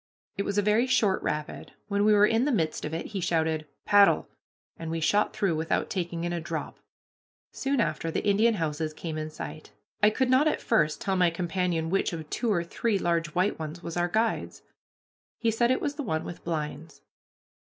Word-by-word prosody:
It 200 - -2
was 200 - -2
a 205 - +3
very 215 +5 +3
short 210 -7 +2
rapid. 150 0 -4
When 200 0 +1
we 215 - +6
were 205 0 +6
in 225 +3 +2
the 295 - +1
midst 160 - 0
of 150 - -5
it 165 - -4
he 195 - -1
shouted, 160 -3 0 0.2
"Paddle!" 205 -1 +5 0.5
and 165 - -6
we 165 0 -2
shot 205 +6 +2
through 190 -5 0
without 160 +1 -1
taking 170 -2 -3
in 175 0 -1
a 170 - -2
drop. 165 -1 -5 0.7
Soon 275 0 -1
after 165 -7 0
the - - -2
Indian 215 +3 +4
houses 155 -3 -2
came 160 -2 -5
in 155 0 -3
sight. 155 0 -8 0.3
I 210 - +7
could 255 +4 0
not 265 +4 +5
at - - +1
first 155 -10 +1
tell 195 -1 0
my 180 -2 +4
companion 170 -1 -1
which 195 -2 +1
of 160 -2 -6
two 235 -3 0
or 170 -4 +1
three 210 +5 -1
large 170 -4 -1
white 185 +2 +1
ones 160 +2 -6
was 170 - -5
our 175 0 +1
guide's. 225 +5 -1 0.7
He 230 - +1
said 235 +2 +2
it 255 - +2
was 285 - -1
the - - -2
one 160 -9 -1
with 175 - -8
blinds. 155 -1 -5
175 Hz, 205 wpm, -27 LUFS, 160-210 Hz, 0.7 s, I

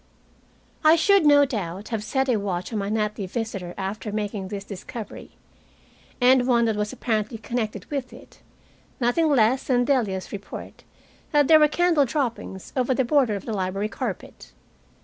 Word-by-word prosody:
I 310 +1 +7
should, 375 0 +4
no 285 -1 +7
doubt, 200 - -5
have 220 -3 -3
set 265 +4 0
a 245 -4 +2
watch 190 0 -3
on 215 - -1
my 200 0 -2
nightly 210 -2 -1
visitor 195 -4 -4
after 200 +2 -4
making 205 -2 -3
this 200 0 -5
discovery 205 +2 -9 0.8
and 250 0 +5
one 235 -2 +3
that 220 -2 +1
was 210 0 -2
apparently 220 -1 -2
connected 220 -3 -4
with 270 -3 -3
it - - -15 0.6
nothing 265 +7 +2
less 255 -2 +3
than 245 -2 +2
Delia's 220 -9 0
report 205 0 -8 0.5
that 290 -2 +4
there 315 -1 +7
were 300 - +6
candle 330 -2 +3
droppings 235 -8 -4
over 255 0 +1
the 260 - +1
border 250 -5 +2
of 200 - -6
the 225 - -3
library 195 +1 -2
carpet. - - -6
225 Hz, 165 wpm, -24 LUFS, 205-265 Hz, 0.8 s, I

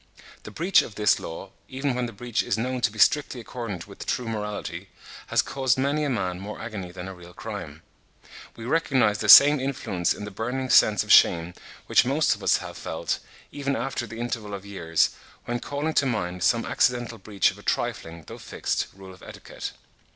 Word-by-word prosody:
The - - -10
breach 170 - +3
of 105 - -9
this 105 -1 +3
law, 95 +4 -8 0.2
even 135 +1 -2
when 125 0 -2
the - - -8
breach 120 +2 -2
is 100 - -1
known 125 +2 -2
to 110 - +2
be 110 - -13
strictly 135 +3 +3
accordant 115 -6 -6
with 100 - -10
true 125 - -1
morality, 105 -4 -5 0.4
has - - +2
caused 130 -2 0
many 140 +3 0
a 145 - 0
man 95 -7 -2
more 105 +2 -7
agony 100 -6 -6
than 90 +1 -8
a 95 - -7
real 90 -1 -14
crime. - - -7 0.7
We 115 - -9
recognise 130 -8 +2
the 105 - -2
same 145 +8 +10
influence 125 -10 -1
in 105 - -7
the 105 - -8
burning 125 +6 -3
sense 105 -3 +5
of - - -3
shame 85 +1 +5 0.3
which - - +4
most 140 +4 +2
of - - -10
us - - +3
have - - -8
felt, - - -3 0.3
even 140 -1 -2
after 120 0 -3
the 115 +1 -9
interval 115 -4 -4
of 100 0 -9
years, 80 -5 +1 0.3
when 120 0 -2
calling 145 +5 -3
to 140 - +2
mind 90 -7 -2
some 115 +5 +2
accidental 120 -2 0
breach 100 -3 +1
of - - -14
a - - -12
trifling, 80 0 -3
though - - -10
fixed, - - -2
rule 95 -1 -12
of 90 - -17
etiquette. - - -8
115 Hz, 200 wpm, -25 LUFS, 95-130 Hz, 0.7 s, same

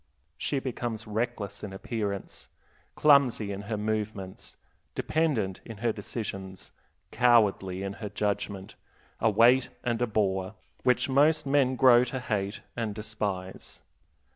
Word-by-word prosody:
She 145 - -2
becomes 120 -4 -3
reckless 105 -2 -3
in 100 -2 -6
appearance, 100 -1 -4 0.5
clumsy 135 -8 +4
in 100 0 -4
her 110 - -1
movements, 105 -3 -4 0.4
dependent 130 - 0
in 115 -3 -9
her 115 +2 +1
decisions, 95 -3 -6 0.4
cowardly 105 -6 +3
in 100 0 -3
her 105 - -4
judgment, 100 -1 -3 0.5
a 110 - +3
weight 120 +4 +5
and 120 -1 -1
a 120 - +2
bore, 95 -2 0 0.3
which 125 - +2
most 150 +3 +3
men 135 -2 +3
grow 125 -1 +7
to 130 +1 -4
hate 100 -4 -2
and 110 -4 -3
despise. 105 -3 -5
110 Hz, 125 wpm, -28 LUFS, 100-125 Hz, 0.5 s, grow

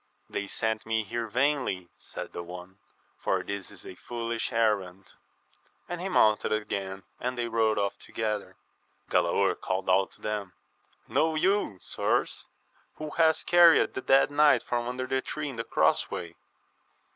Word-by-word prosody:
They 100 - -3
sent 110 +1 -2
me 110 0 +1
here 115 +3 -3
vainly, 125 -8 0
said - - -8
the 85 - -4
one, 90 +2 -10 0.4
for 95 -1 0
this 100 0 -5
is - - -14
a - - -8
foolish 115 +4 -4
errand; 100 -5 0 0.7
and 175 -1 -5
he 190 - -2
mounted 110 - +3
again, 100 -3 -2 0.2
and 125 0 -3
they 120 -1 -1
rode 115 -1 +2
off 100 -1 -1
together, 105 -2 -3 0.6
Galaor 90 +2 +3
called 95 0 -1
out 95 +1 +3
to - - -14
them, 105 -3 -3 0.5
Know 160 0 +1
you, 185 - +1
sirs, - - -1 0.5
who 155 -1 -6
hath 160 0 +3
carried 175 -1 +6
the 130 - -4
dead 135 +2 +4
knight 150 0 +5
from 120 -1 -2
under 125 +1 -3
the 130 0 0
tree 150 +2 -4
in 130 - -8
the 115 - -2
cross - - +2
way? 85 -2 -5
110 Hz, 155 wpm, -28 LUFS, 95-130 Hz, 0.7 s, carried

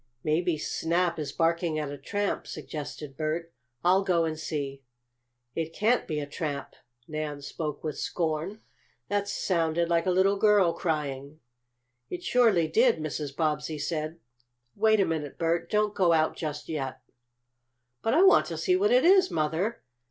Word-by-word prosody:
"Maybe 160 +2 +1
Snap 170 +3 0
is 145 -2 -3
barking 165 0 +1
at 150 -2 -3
a 145 - -6
tramp," 205 -1 -2
suggested 145 -1 -7
Bert. 160 +3 -3 0.3
"I'll 185 +3 +4
go 175 -3 +2
and 160 -1 -2
see." 140 -4 -4 0.7
"It 165 +2 -3
can't 230 +4 +2
be 155 -2 -2
a 145 - -3
tramp!" 145 -2 -4 0.3
Nan 150 -2 -4
spoke 150 +1 -5
with 155 -2 -4
scorn. 165 +5 -2 0.5
"That 205 0 0
sounded 170 -3 0
like 170 +1 +2
a - - +4
little 190 +2 +3
girl 200 -4 +4
crying." 145 -2 -3 0.7
"It 175 0 -5
surely 220 -10 +3
did," 230 +6 +4
Mrs. 150 -2 -4
Bobbsey 155 0 -1
said. 155 +2 -3 0.6
"Wait 220 +1 +4
a 195 - +4
minute, 155 -4 -3
Bert. 165 0 0
Don't 210 0 +1
go 180 -5 +3
out 160 -1 +2
just 150 -2 -5
yet." 140 -5 -4 1.0
"But 225 - +1
I 345 - +6
want 385 - +6
to - - -5
see 365 - +2
what 400 +3 +3
it - - +4
is, 375 +1 +6
Mother!" 160 +9 -1
165 Hz, 160 wpm, -28 LUFS, 150-195 Hz, 1.0 s, I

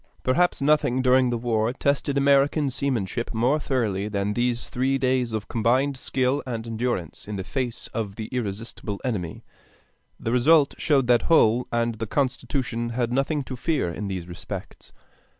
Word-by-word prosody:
Perhaps 160 +3 +2
nothing 140 -3 +3
during 130 0 +4
the 120 - 0
war 115 -1 0
tested 140 0 0
American 140 +1 +3
seamanship 120 -4 -2
more 125 +7 +2
thoroughly 110 -9 -1
than 100 -1 -1
these 120 +1 -1
three 135 +2 0
days 130 -2 +1
of 110 -2 -3
combined 125 +5 +1
skill 130 +1 0
and 115 -2 -4
endurance 115 -8 -3
in 105 - -4
the 95 - -3
face 125 +1 -3
of 105 -4 -3
the 110 - -5
irresistible 105 -3 -4
enemy. 95 -10 -3 0.8
The 115 - -2
result 140 +4 +4
showed 145 -4 +3
that 120 -1 +4
Hull 125 -6 +4
and 120 0 +1
the 115 - -3
Constitution 125 -2 -1
had 120 0 -1
nothing 140 +2 0
to 130 0 -6
fear 135 - 0
in 100 +5 -5
these 90 -3 -4
respects. 90 - -8
125 Hz, 160 wpm, -25 LUFS, 110-135 Hz, 0.8 s, during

